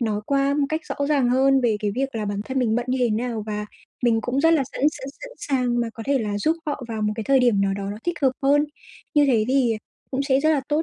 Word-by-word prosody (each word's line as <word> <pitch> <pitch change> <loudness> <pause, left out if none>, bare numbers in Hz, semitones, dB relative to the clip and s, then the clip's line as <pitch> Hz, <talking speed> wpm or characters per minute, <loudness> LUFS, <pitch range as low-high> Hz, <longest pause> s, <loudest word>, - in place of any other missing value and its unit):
nói 215 -3 0
qua 275 0 +2
một 290 -1 +1
cách 315 +1 -1
rõ 285 - -2
ràng 270 -5 +2
hơn 270 +1 +4
về 230 -4 +2
cái 210 - 0
việc 270 +1 -2
là 220 -2 -2
bản 205 0 -3
thân 265 0 -2
mình 225 -3 +1
bận 240 +1 -1
như 255 +1 0
thế 240 -2 +2
nào 225 0 -2
và 210 0 -3 0.4
mình 230 -2 +3
cũng 250 +4 -1
rất 325 - +5
là 290 - +2
sẵn - - -6
sẵn 270 -3 -8
sẵn - - -8
sàng 250 -3 0
mà 235 - -1
có 225 - -7
thể 280 -1 +2
là 210 -3 -2
giúp 315 +10 +1
họ 290 -3 -3
vào 220 -2 -3
một 210 0 +1
cái 220 - -4
thời 275 -1 +4
điểm 235 -5 +3
nào 195 0 +1
đó 200 0 -4
nó 205 - -5
thích 345 -2 -2
hợp 260 -1 +4
hơn. 290 +2 +4 0.5
Như 295 -1 +5
thế 230 -5 +3
thì 255 -4 +2 0.3
cũng 270 +1 -1
sẽ 270 -1 +2
rất 310 +2 +3
là 295 -3 +2
tốt 300 +2 +1
255 Hz, 290 wpm, -23 LUFS, 220-275 Hz, 0.5 s, rất